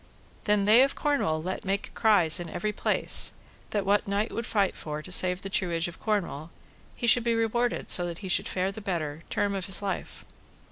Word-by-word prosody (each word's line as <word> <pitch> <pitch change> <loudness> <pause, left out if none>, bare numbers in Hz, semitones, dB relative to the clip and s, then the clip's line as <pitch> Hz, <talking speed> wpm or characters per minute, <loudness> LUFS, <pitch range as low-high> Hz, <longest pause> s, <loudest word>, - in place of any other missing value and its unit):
Then 210 -1 +2
they 220 +4 +6
of 275 +1 +2
Cornwall 160 - -1
let 185 +2 -4
make 195 +1 -3
cries 180 -7 +4
in 175 -1 -6
every 210 +5 -3
place, - - +2 0.4
that 205 -2 -2
what 205 +1 +1
knight 200 +2 -1
would 230 - -4
fight 200 -3 0
for 150 0 -6
to 185 - -10
save 180 +1 +2
the - - -4
truage 170 -4 +1
of 170 - -10
Cornwall, 175 -8 -3 0.5
he - - -4
should 235 +1 +5
be 235 -1 +1
rewarded 235 +2 0
so 175 -1 +5
that 170 -1 -6
he - - -4
should 185 - 0
fare 185 +1 -2
the 215 - -9
better, 160 -6 -4
term 205 -1 -1
of 190 -2 -4
his 190 - +2
life. 200 -1 -5
195 Hz, 205 wpm, -27 LUFS, 175-215 Hz, 0.5 s, they